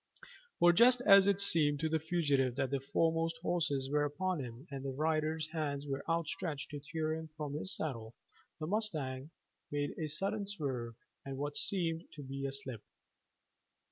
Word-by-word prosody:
For 175 0 +6
just 245 +6 +6
as 195 -4 +7
it 200 -1 +3
seemed 155 -7 +3
to 160 - +1
the 160 0 +1
fugitive 145 -6 +1
that 135 0 -1
the 140 - +1
foremost 165 +4 0
horses 150 -7 0
were 150 0 +3
upon 170 +4 -1
him 125 0 -7
and 135 -1 -5
their 135 - -2
riders' 155 +2 0
hands 145 -3 -2
were 135 -1 -3
outstretched 160 -2 -2
to 145 - -5
tear 155 +2 -2
him 160 0 -5
from 150 -2 -4
his 155 +6 -1
saddle, 115 -7 -4 0.4
the 155 - -3
mustang 155 -9 -1 0.4
made 145 0 -2
a 155 - -1
sudden 195 +7 -1
swerve 130 - -3 0.3
and 135 -1 -6
what 145 +1 -3
seemed 170 -3 +1
to 150 - -8
be 135 +1 -4
a - - -3
slip. 130 -5 -4
155 Hz, 175 wpm, -34 LUFS, 140-165 Hz, 0.4 s, as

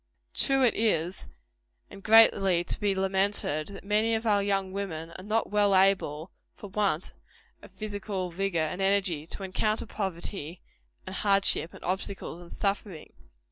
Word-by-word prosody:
True 270 -1 +3
it 240 - +4
is 185 -5 -1 0.6
and 200 - -11
greatly 195 -5 +5
to - - 0
be 205 -2 0
lamented 190 -5 +1
that 200 - -10
many 215 +3 +1
of 225 +1 -3
our 205 -2 +3
young 195 -1 0
women 165 -5 -4
are 185 - -10
not 215 +2 -1
well 205 -1 +3
able, 185 -4 +2 0.2
for 205 - -11
want 195 -5 0 0.5
of - - -13
physical 205 -3 -5
vigor 195 0 -2
and 160 +4 -1
energy, 190 -6 +1
to 195 - -6
encounter 215 +3 -1
poverty, 180 -3 -5 0.4
and 190 +1 -6
hardship, 195 -4 +3
and - - -13
obstacles, 185 -1 -4
and 175 - -13
suffering. 195 -4 -3
195 Hz, 150 wpm, -28 LUFS, 175-205 Hz, 0.6 s, greatly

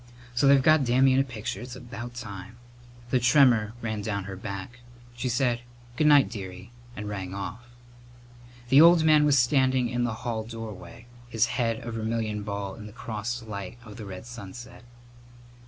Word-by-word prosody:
So 120 +3 +3
they've 140 -1 +6
got 155 -1 +5
Dammy 130 +2 +4
in 130 - +3
a - - +4
picture. 115 -5 -5
It's 125 0 -8
about 120 0 -8
time!" 105 -1 -8 0.5
The 130 - +3
tremor 120 -4 +4
ran 110 -2 -2
down 100 -1 -2
her 95 0 -7
back. 100 +4 -7 0.4
She 125 +1 -2
said 120 -1 +1 0.3
"Good 150 - +2
night, 145 -5 +7
dearie," 95 -1 -8 0.2
and 105 -1 -6
rang 95 -2 -5
off. 110 +4 -6 1.0
The 135 +3 +8
old 170 0 +7
man 155 -1 +5
was 145 -1 +4
standing 130 -1 +3
in 120 0 -1
the 120 0 -3
hall 115 -2 -2
doorway, 115 -1 -9 0.2
his 115 -2 +2
head 115 -2 -1
a 115 - -4
vermilion 110 -1 -2
ball 100 -1 -4
in 105 0 -10
the 105 - -12
crossed 115 0 -5
light 100 0 -6
of 105 -2 -11
the 110 - -7
red 95 +1 -8
sunset. 120 +1 -10
115 Hz, 175 wpm, -27 LUFS, 105-125 Hz, 1.0 s, The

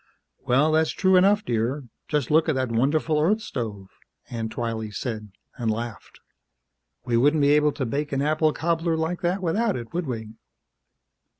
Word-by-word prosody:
"Well, 140 +5 +2
that's 160 0 +3
true 190 -1 +2
enough, 200 +3 +4
dear. 120 +5 -1 0.2
Just 150 -4 -1
look 160 +1 +4
at 155 - +1
that 130 -2 -1
wonderful 150 +6 +1
Earth 205 +8 +3
stove," 110 - -5 0.4
Aunt 115 -2 -3
Twylee 115 -2 -3
said, 110 0 -5 0.3
and 120 -3 -1
laughed. 115 0 -5 0.9
"We 120 -2 +1
wouldn't 145 +5 +3
be 140 0 +4
able 150 0 +4
to 130 - -3
bake 145 +5 -2
an 135 0 0
apple 155 +1 +2
cobbler 165 +1 0
like 160 +3 -2
that 185 +2 -1
without 205 +5 +1
it, 115 -2 -7
would 175 -2 -2
we?" 110 -3 -5
145 Hz, 170 wpm, -25 LUFS, 115-160 Hz, 0.9 s, enough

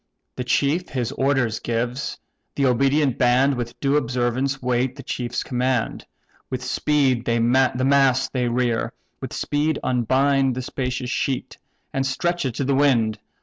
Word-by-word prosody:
The 125 - -3
chief 145 +8 +1
his 125 -2 -2
orders 130 -5 0
gives; 120 +4 -2 0.4
the 140 - +1
obedient 135 +1 +2
band 130 +3 +4
With 120 -1 -5
due 140 +1 +2
observance 130 +1 -1
wait 125 0 0
the 140 - -9
chief's 120 0 -3
command; 125 -2 -1 0.4
With 130 0 -4
speed 130 -1 +1
the 115 0 +1
mast 130 +2 +3
they 125 -2 0
rear, 120 -1 0 0.3
with - - -6
speed 150 +1 0
unbind 130 +2 +2
The 130 - -4
spacious 125 -1 -3
sheet, 135 +1 -2 0.3
and 135 - 0
stretch 175 +5 -1
it 125 -3 -2
to - - -1
the 135 +1 +1
wind. 120 -6 +2
130 Hz, 150 wpm, -23 LUFS, 120-140 Hz, 0.4 s, band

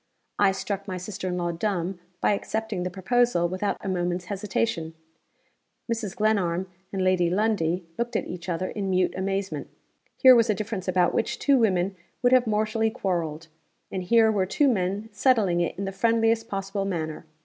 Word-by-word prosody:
I 200 -1 +5
struck 200 +1 -4
my 185 -2 -3
sister 190 +1 -5
in 180 -1 -2
law 175 -1 -1
dumb 180 0 -2 0.2
by - - +3
accepting 220 -1 -3
the 180 - -2
proposal 190 0 +2
without 185 +3 -2
a - - -6
moment's 180 -1 -1
hesitation. 195 -5 -2 1.0
Mrs. 215 -5 -5
Glenarm 190 -4 +1 0.2
and 190 -1 -1
Lady 185 -2 +3
Lundie 180 -3 0
looked 240 0 -2
at - - 0
each 180 0 -7
other 180 +2 -1
in 200 -2 -3
mute 185 -1 +2
amazement. 195 +1 -2 0.5
Here 260 -1 +8
was 230 -1 +4
a 210 - +3
difference 205 -2 -4
about 180 -1 +2
which 230 - 0
two 280 -2 +3
women 190 -3 +1 0.3
would 245 +1 +5
have 255 -2 +5
mortally 220 +1 +1
quarreled; 170 -8 -2 0.5
and 190 - -2
here 220 +4 +4
were 195 -3 +1
two 285 +9 +2
men 200 -2 0
settling 205 -6 +2
it 170 - -2
in 195 - -3
the 195 - -3
friendliest 225 +2 +2
possible 195 0 -3
manner. 160 -4 -4
195 Hz, 175 wpm, -26 LUFS, 180-220 Hz, 1.0 s, Here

